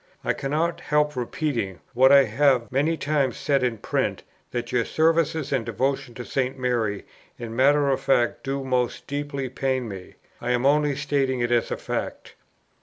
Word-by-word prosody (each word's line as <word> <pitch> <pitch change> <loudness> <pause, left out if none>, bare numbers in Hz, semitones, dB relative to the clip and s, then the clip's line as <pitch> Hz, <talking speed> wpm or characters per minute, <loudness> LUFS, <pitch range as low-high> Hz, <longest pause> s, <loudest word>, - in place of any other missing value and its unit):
I - - +1
cannot 155 +5 -1
help 150 0 +1
repeating 125 - -2
what 130 +2 +5
I 140 -1 +8
have 125 0 +2
many 150 +5 +1
times 145 -5 0
said 140 -2 +1
in 125 -3 0
print, - - -2 0.3
that 120 -1 -4
your 125 -2 +2
services 160 0 +1
and 130 -4 +1
devotions 130 +1 -2
to 120 - -6
St. 130 -1 -1
Mary 115 -6 -1 0.3
in 115 -1 -7
matter 140 +3 +4
of 135 - +1
fact 120 -3 +1
do 135 0 -2
most 125 -2 -1
deeply 140 -1 -3
pain 130 -1 -2
me. 95 -3 -9 0.3
I 125 +1 0
am 125 +1 0
only 145 0 +3
stating 140 -2 0
it 120 0 0
as 120 -1 +2
a - - -2
fact. - - -5
135 Hz, 175 wpm, -24 LUFS, 120-145 Hz, 0.3 s, I